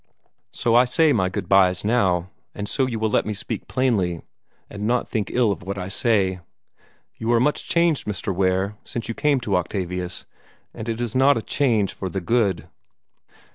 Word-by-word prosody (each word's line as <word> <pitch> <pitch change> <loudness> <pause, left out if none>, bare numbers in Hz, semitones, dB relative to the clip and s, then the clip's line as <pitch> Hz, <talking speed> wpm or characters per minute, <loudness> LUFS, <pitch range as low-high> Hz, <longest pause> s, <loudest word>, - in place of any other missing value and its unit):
So 115 - 0
I 120 +2 +6
say 150 +4 +3
my 95 -6 +1
good 95 -1 -4
byes 95 -1 +4
now, 95 -6 +1 0.2
and 100 0 -4
so 135 +3 +1
you 120 -3 -3
will 110 -1 -1
let - - +2
me 105 - -4
speak 100 - -5
plainly, 105 -10 0 0.4
and 105 +1 -5
not 120 +1 +1
think 105 -4 -2
ill 120 -4 +2
of 95 - -4
what 100 +3 -5
I 95 0 -4
say. 95 -3 +1 0.8
You 115 +1 -1
are 115 - +4
much 145 +5 0
changed, 170 -6 +2
Mr. 100 -1 -2
Ware, 95 +2 0
since 120 - -5
you 115 - -3
came 145 +2 +1
to 105 -4 -1
Octavius, 90 0 -3 0.5
and 110 +1 -6
it 115 0 -3
is 120 -2 -3
not 135 +1 +4
a - - -2
change 115 -9 +1
for 95 - -5
the 95 - -3
good." 100 -2 0
105 Hz, 190 wpm, -23 LUFS, 95-120 Hz, 0.8 s, I